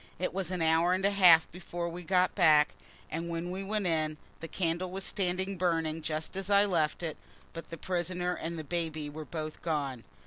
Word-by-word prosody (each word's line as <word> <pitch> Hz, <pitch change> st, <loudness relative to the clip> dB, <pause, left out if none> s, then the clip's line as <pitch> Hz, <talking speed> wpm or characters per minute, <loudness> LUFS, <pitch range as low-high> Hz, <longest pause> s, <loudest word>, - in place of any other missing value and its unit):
It 180 Hz, -, -2 dB
was 190 Hz, -2 st, -1 dB
an 180 Hz, -3 st, -1 dB
hour 165 Hz, +2 st, +4 dB
and 190 Hz, +1 st, 0 dB
a 200 Hz, -, +4 dB
half 180 Hz, -5 st, +7 dB
before 175 Hz, 0 st, -5 dB
we 170 Hz, +1 st, -6 dB
got 180 Hz, +1 st, +2 dB
back, 150 Hz, -1 st, +5 dB, 0.4 s
and 165 Hz, +2 st, -3 dB
when 170 Hz, +1 st, -3 dB
we 190 Hz, +1 st, -4 dB
went 210 Hz, 0 st, -2 dB
in, 155 Hz, -3 st, 0 dB, 0.2 s
the 165 Hz, -, -6 dB
candle 175 Hz, +1 st, -1 dB
was 190 Hz, +1 st, -5 dB
standing 190 Hz, 0 st, -1 dB
burning 165 Hz, -3 st, 0 dB
just 155 Hz, +2 st, -4 dB
as 195 Hz, 0 st, -4 dB
I 200 Hz, 0 st, +6 dB
left 170 Hz, -4 st, 0 dB
it, 160 Hz, -2 st, -3 dB, 0.4 s
but 165 Hz, -, -8 dB
the 165 Hz, -, -7 dB
prisoner 180 Hz, +1 st, -1 dB
and 170 Hz, 0 st, -4 dB
the 160 Hz, -, -4 dB
baby 155 Hz, -2 st, -3 dB
were 155 Hz, +1 st, -7 dB
both 155 Hz, -1 st, -6 dB
gone. 140 Hz, -7 st, -2 dB
170 Hz, 205 wpm, -30 LUFS, 160-185 Hz, 0.4 s, half